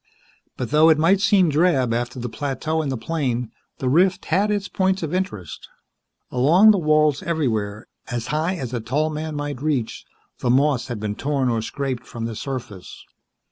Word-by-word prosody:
But - - -4
though 155 +2 +6
it 160 - +5
might 180 +5 +3
seem 195 -5 +4
drab 145 -6 +2
after 120 +2 -3
the 125 0 -4
plateau 145 +6 -2
and 145 -3 -2
the 130 - -2
plain, 125 -4 -2 0.3
the 130 - -3
rift 180 +8 +3
had 195 +6 +1
its 205 -1 -1
points 190 -1 0
of 160 +1 -3
interest. 145 - -4 0.6
Along 165 +12 +6
the 200 - +2
walls, 155 -3 +3
everywhere, 115 - -2 0.2
as 120 -2 -3
high 160 +5 0
as 130 -7 -5
a 120 - -1
tall 145 +8 -1
man 155 0 -4
might 145 -3 -4
reach, 140 -7 -2 0.4
the 125 - -1
moss 130 -1 +2
had 120 -4 -5
been 105 -1 -3
torn 135 +2 -1
or 115 -2 0
scraped 130 0 -4
from 115 -1 -5
the 115 -1 -4
surface. 120 -6 -7
145 Hz, 180 wpm, -22 LUFS, 120-160 Hz, 0.6 s, though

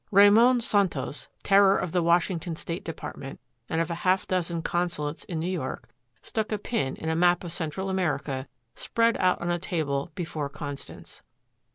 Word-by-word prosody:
Ramon 220 +5 +6
Santos, 185 -10 0
terror 195 0 +5
of 180 - -2
the 180 - +2
Washington 170 0 +1
State 165 +2 -5
Department 140 -4 -7 0.3
and 160 - 0
of 165 +1 0
a 170 - -4
half 185 +1 +2
dozen 170 -2 -1
consulates 170 -4 -2
in 165 -3 -4
New 160 - -2
York, 175 -8 -4 0.4
stuck 220 -1 -3
a 215 - +1
pin 200 - -2
in 160 - -7
a 160 - +1
map 175 +1 +3
of 170 -2 -4
Central 175 +3 -3
America 145 -8 -1 0.3
spread 230 - +1
out 185 -1 +2
on 175 0 -1
a 175 - 0
table 155 -4 -2
before 155 -5 -3
Constance. 145 0 -8
175 Hz, 170 wpm, -27 LUFS, 160-190 Hz, 0.4 s, Ramon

